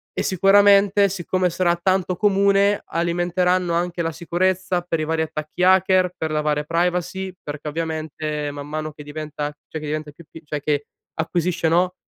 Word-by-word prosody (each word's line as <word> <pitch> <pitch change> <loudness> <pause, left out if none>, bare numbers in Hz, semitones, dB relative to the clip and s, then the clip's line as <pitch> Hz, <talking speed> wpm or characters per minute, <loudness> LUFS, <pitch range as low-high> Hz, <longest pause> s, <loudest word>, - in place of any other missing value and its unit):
e - - -1
sicuramente, 200 +1 +5
siccome 185 0 -1
sarà 175 0 +1
tanto 185 +1 0
comune, 200 0 +3
alimenteranno 175 +1 0
anche 175 0 -1
la 165 - -1
sicurezza 180 +2 0
per 165 -2 -2
i 155 - -1
vari 160 0 0
attacchi 155 +3 -4
hacker, 185 -1 +4
per 160 - -2
la 155 0 0
varia 150 -1 0
privacy, 180 +3 -1
perché 150 +1 -7
ovviamente 155 -1 -3
man 145 0 -8
mano 155 0 -4
che 150 - -12
diventa, 150 0 -5 0.2
cioè 160 - -5
che 150 - -6
diventa 155 0 -4
più 170 +4 -15
p 160 - -12
cioè 150 -1 -4
che 145 -1 -1 0.3
acquisisce, 170 +1 -1
no, 180 +2 +2
170 Hz, 170 wpm, -22 LUFS, 155-185 Hz, 0.3 s, sicuramente